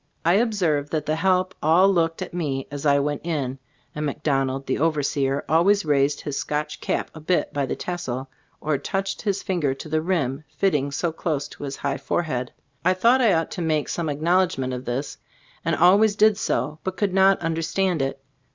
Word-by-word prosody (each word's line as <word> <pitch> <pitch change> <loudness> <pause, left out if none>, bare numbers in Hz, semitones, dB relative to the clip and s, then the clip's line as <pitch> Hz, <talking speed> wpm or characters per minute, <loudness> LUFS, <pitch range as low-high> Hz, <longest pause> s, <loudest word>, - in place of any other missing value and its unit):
I 170 - +5
observed 185 -10 +1
that 155 -2 -1
the 155 +1 0
help 185 +1 +2
all 165 +5 +5
looked 165 -4 +1
at - - -9
me 140 -6 -2
as 145 +1 -3
I 140 0 +5
went 145 0 -1
in, 140 -6 -2 0.3
and 150 - -4
McDonald, 135 -2 -1
the - - -1
overseer, 145 -3 0
always 180 +4 +3
raised 145 -1 +2
his 145 -2 -3
Scotch 150 0 -3
cap - - -2
a 160 - -9
bit 175 +3 0
by 140 -2 -1
the - - -2
tassel, 135 -8 -4 0.3
or 150 -2 0
touched 195 0 -3
his 200 -2 -1
fin 185 -3 -1
ger 135 -3 +1
to 145 - -9
the 155 +1 0
rim, 155 -5 -1
fitting 150 -8 +1
so 165 +4 -1
closely 155 -3 -3
to - - -10
his 135 -1 -4
high 140 -1 -2
forehead. 130 -7 -2 0.3
I 185 +2 +3
thought 235 +7 +4
I 225 -6 +5
ought 165 -1 0
to 180 - -4
make 155 -3 0
some 165 -2 -2
acknowledgement 155 -3 +1
of 125 +1 -5
this, 130 +4 -3 0.4
and - - +1
always 200 +4 +5
did 215 0 +5
so, 155 -6 -2
but 190 -1 -4
could 195 0 0
not 195 0 +5
understand 165 +1 0
it. 135 0 -2
155 Hz, 195 wpm, -24 LUFS, 140-185 Hz, 0.4 s, I